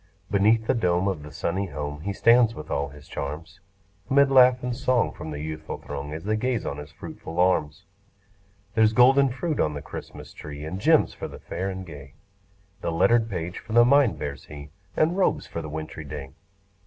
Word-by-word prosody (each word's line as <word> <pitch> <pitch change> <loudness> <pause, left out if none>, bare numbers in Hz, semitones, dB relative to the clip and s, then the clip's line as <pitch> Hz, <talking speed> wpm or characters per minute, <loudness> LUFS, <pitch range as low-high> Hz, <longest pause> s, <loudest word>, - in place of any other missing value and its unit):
Beneath 110 +3 +3
the - - +2
dome 90 -5 +1
of 95 -6 -2
the 75 0 -10
sunny 95 +5 -2
home, 75 -1 -5
He 100 +4 -3
stands 115 +2 +4
with 75 - -8
all 70 0 -1
his 75 0 -14
charms; 80 +6 -6 0.5
'Mid 140 0 +4
laugh 125 -1 +6
and 125 -1 -2
song 130 -4 +1
from - - -8
the 75 -1 -5
youthful 80 0 -5
throng, 70 0 -6
As 80 +1 -6
they 110 +2 0
gaze 120 0 -1
on 70 - -3
his 75 0 -9
fruitful 80 +2 -9
arms. 80 -5 +1 0.9
There's 110 -1 +4
golden 135 +4 +6
fruit 145 +5 -3
on 75 -1 +1
the 70 - -5
Christmas - - -9
tree, 75 0 -8
And 95 +5 -5
gems 160 +5 +4
for - - -6
the - - -10
fair 95 +1 -4
and 95 0 -6
gay; 70 -4 -11 0.7
The - - -2
lettered 115 +7 +3
page 90 -2 -4
for 110 - -9
the 120 0 +7
mind 130 - +4
bears 75 -1 -6
he, 70 0 -10 0.3
And 160 +3 +3
robes 195 - +1
for 85 - -5
the 80 - -7
wintry 80 0 -6
day. 70 -2 -7
90 Hz, 200 wpm, -25 LUFS, 75-120 Hz, 0.9 s, the